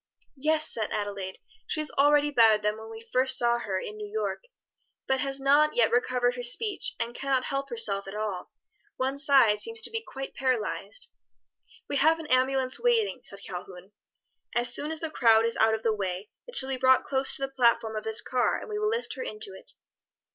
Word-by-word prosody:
"Yes," 310 +3 +1
said 220 -2 -2
Adelaide, 200 -2 -4 0.3
"she - - -3
is 305 -1 -2
already 290 +1 +3
better 225 -5 +5
than 210 0 -1
when 220 0 -10
we 225 +1 -11
first 260 +1 +3
saw 240 0 +2
her 190 -5 -3
in 425 - -7
New 420 -1 -7
York, 440 +3 -3 0.6
but 265 0 +1
has 275 0 -1
not 290 +3 +3
yet 230 -2 +3
recovered 245 0 +1
her 245 - -5
speech 400 - -1
and 235 - -3
can 275 +2 -6
not 260 -2 +2
help 275 +1 -3
herself 205 -5 0
at 195 - -7
all. 210 -4 -4 0.5
One 265 +1 -1
side 275 -7 +4
seems 455 0 -2
to - - +2
be 450 0 -3
quite 270 -10 -8
paralyzed." 255 - -2 0.8
"We 285 - -2
have 315 +4 +4
an 325 - -8
ambulance 260 0 +1
waiting," 460 - +1
said 200 -3 -9
Calhoun. 180 +1 -9 0.6
"As 240 0 +5
soon 295 - +3
as 320 -1 -3
the 325 -2 -4
crowd 230 -5 +4
is 230 - 0
out 220 0 +3
of 220 - -8
the 225 - +2
way 195 -1 -4 0.2
it - - -9
shall 265 - +5
be 265 - -2
brought 260 0 +4
close 265 -1 +2
to 275 - -2
the - - 0
platform 235 -3 +2
of 215 - -4
this 220 0 +1
car 250 -1 0
and - - -10
we 420 0 -3
will 425 0 0
lift 465 +2 -3
her - - -7
into 425 -4 -3
it." - - -12
260 Hz, 210 wpm, -27 LUFS, 220-295 Hz, 0.8 s, better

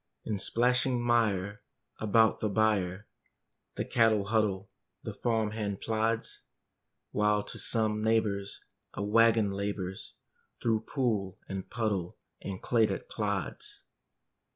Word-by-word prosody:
In 105 -3 -2
splashing 125 +4 +2
mire 110 -3 +1 0.4
about 110 +1 +3
the 110 - 0
byre 100 -2 +1 0.7
The - - -2
cattle 110 -4 +3
huddle, 100 -3 0 0.3
the - - -5
farm 110 -3 0
hand 105 -3 -3
plods; 115 +1 -1 0.7
While 105 0 +2
to - - -7
some 110 -2 +1
neighbor's 105 -3 0 0.3
a - - -2
wagon 110 0 +4
labors 100 -1 -4 0.4
Through 110 -1 0
pool 105 -9 0
and 95 -1 -5
puddle 105 -7 -2 0.2
and 95 -1 -5
clay 115 -3 +3
that - - -5
clods. - - -3
110 Hz, 115 wpm, -30 LUFS, 100-115 Hz, 0.7 s, wagon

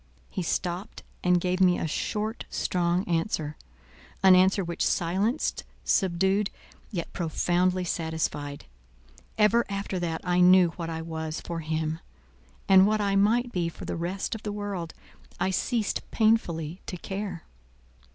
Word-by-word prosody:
He - - -3
stopped, 180 +3 -3 0.2
and 180 0 +4
gave 180 +1 -1
me 180 -1 +5
a - - -2
short, 210 +7 -2
strong 175 +1 0
answer; 165 -3 -1 0.7
an 190 -1 +8
answer 190 +2 +4
which 170 -1 -2
silenced, 195 - 0 0.2
subdued, 190 +2 +2 0.4
yet 170 -5 -5
profoundly 180 +2 +1
satisfied. 160 -4 -3 0.7
Ever 220 +2 +4
after 200 -2 -3
that 165 -2 -2
I 180 0 +1
knew 180 0 +7
what 165 0 -6
I 160 0 -4
was 160 -1 -4
for 170 -1 -5
him; 160 0 -2 0.7
and 190 0 +7
what 215 0 +2
I 200 -1 +1
might 230 +5 +3
be 175 -4 -1
for - - -10
the - - -3
rest 175 +3 -3
of 220 - -6
the 210 - -4
world, 200 -5 -4 0.4
I 190 - +1
ceased 220 +3 0
painfully 180 -7 +1
to 180 - -4
care. 195 -1 -5
180 Hz, 140 wpm, -27 LUFS, 165-200 Hz, 0.7 s, an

